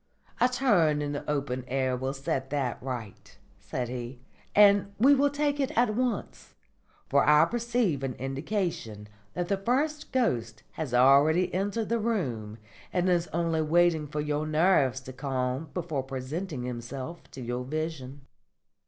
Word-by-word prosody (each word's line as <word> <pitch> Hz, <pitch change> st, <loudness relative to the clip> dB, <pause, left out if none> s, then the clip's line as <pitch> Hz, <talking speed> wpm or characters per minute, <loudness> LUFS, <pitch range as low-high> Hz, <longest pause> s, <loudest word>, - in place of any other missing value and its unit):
"A 245 Hz, -, +4 dB
turn 200 Hz, -, +3 dB
in 145 Hz, -1 st, -2 dB
the 145 Hz, -, -5 dB
open 140 Hz, -3 st, -2 dB
air 130 Hz, 0 st, 0 dB
will 130 Hz, +1 st, -2 dB
set 135 Hz, 0 st, -2 dB
that 135 Hz, -4 st, -2 dB
right," 120 Hz, -6 st, -7 dB, 0.2 s
said 125 Hz, -1 st, -4 dB
he, 120 Hz, +1 st, -6 dB, 0.4 s
"and 200 Hz, -1 st, +6 dB
we 265 Hz, +6 st, +6 dB
will 285 Hz, +1 st, +3 dB
take 290 Hz, 0 st, -1 dB
it 270 Hz, -1 st, +1 dB
at 235 Hz, -2 st, +3 dB
once; 240 Hz, -3 st, -3 dB, 0.5 s
for 140 Hz, 0 st, +3 dB
I 150 Hz, 0 st, +6 dB
perceive 235 Hz, -, 0 dB
an 135 Hz, -2 st, -3 dB
indication 135 Hz, -, -3 dB, 0.3 s
that 175 Hz, 0 st, -2 dB
the 200 Hz, -, +1 dB
first 290 Hz, +9 st, -1 dB
ghost 120 Hz, -, -1 dB
has 155 Hz, -6 st, -5 dB
already 145 Hz, +8 st, +5 dB
entered 205 Hz, +4 st, -1 dB
the 230 Hz, 0 st, +1 dB
room 125 Hz, -, -2 dB, 0.3 s
and 180 Hz, 0 st, +1 dB
is 175 Hz, -1 st, +2 dB
only 165 Hz, -1 st, 0 dB
waiting 160 Hz, -1 st, +3 dB
for 150 Hz, +1 st, -3 dB
your 150 Hz, +1 st, -1 dB
nerves 155 Hz, -5 st, +3 dB
to 130 Hz, 0 st, -9 dB
calm 130 Hz, +2 st, -2 dB
before 165 Hz, -6 st, -2 dB
presenting 135 Hz, +3 st, -5 dB
himself 125 Hz, +6 st, -6 dB
to 135 Hz, -, -8 dB
your 120 Hz, +1 st, -3 dB
vision." 145 Hz, -1 st, -4 dB
150 Hz, 155 wpm, -28 LUFS, 130-195 Hz, 0.5 s, and